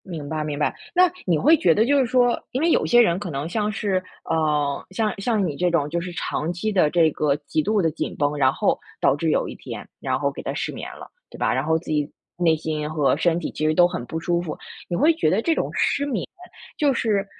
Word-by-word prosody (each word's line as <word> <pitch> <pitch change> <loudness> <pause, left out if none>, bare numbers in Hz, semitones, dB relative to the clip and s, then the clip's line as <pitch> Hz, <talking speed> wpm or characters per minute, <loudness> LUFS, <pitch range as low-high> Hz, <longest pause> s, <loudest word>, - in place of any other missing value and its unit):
明 160 -6 -6
白 155 0 -2
明 150 -1 -4
白。 150 - 0 0.2
那 360 -1 +5
你 175 -4 +2
会 305 - +5
觉 170 - +4
得 215 +7 +3
就 285 +3 +3
是 265 - +3
说， 245 0 +2
因 260 - -2
为 335 - +3
有 - - +2
些 240 0 +6
人 175 -6 +2
可 205 - -5
能 145 0 -3
像 210 +4 -1
是， 195 -3 -1 0.2
呃， 150 -3 0
像 215 +2 0
像 215 -2 +1
你 150 -5 -3
这 180 +3 +1
种 160 -4 +1
就 170 +2 -2
是 180 +1 -6
长 165 -1 -2
期 175 +5 -2
的 180 -7 +3
这 165 -1 +4
个 145 -1 +1
极 155 - +1
度 210 +5 +1
地 165 - +2
紧 155 - -4
绷， 145 0 0
然 130 -2 +4
后 - - 0 0.2
导 - - +3
致 - - -1
有 - - +1
一 - - -7
天， - - -8
然 130 -1 -1
后 140 0 0
给 - - -8
它 - - -4
失 - - -3
眠 - - -7
了， - - -11 0.2
对 - - -12
吧， - - +1
然 130 - 0
后 160 +2 +2
自 160 - -10
己 150 -1 -1 0.3
内 170 -2 +3
心 155 -1 -3
和 150 -4 +2
身 170 +1 +2
体 170 - -4
其 155 - -3
实 155 - +3
都 175 +1 +6
很 175 - -5
不 160 - -4
舒 170 +1 0
服。 165 -3 -5 0.3
你 175 - -1
会 310 - +4
觉 315 - +1
得 190 +7 +2
这 330 - +2
种 - - -1
失 285 - +1
眠， 245 -10 -2 0.5
就 290 -3 +3
是 215 -5 0
170 Hz, 280 characters per minute, -23 LUFS, 155-215 Hz, 0.5 s, 些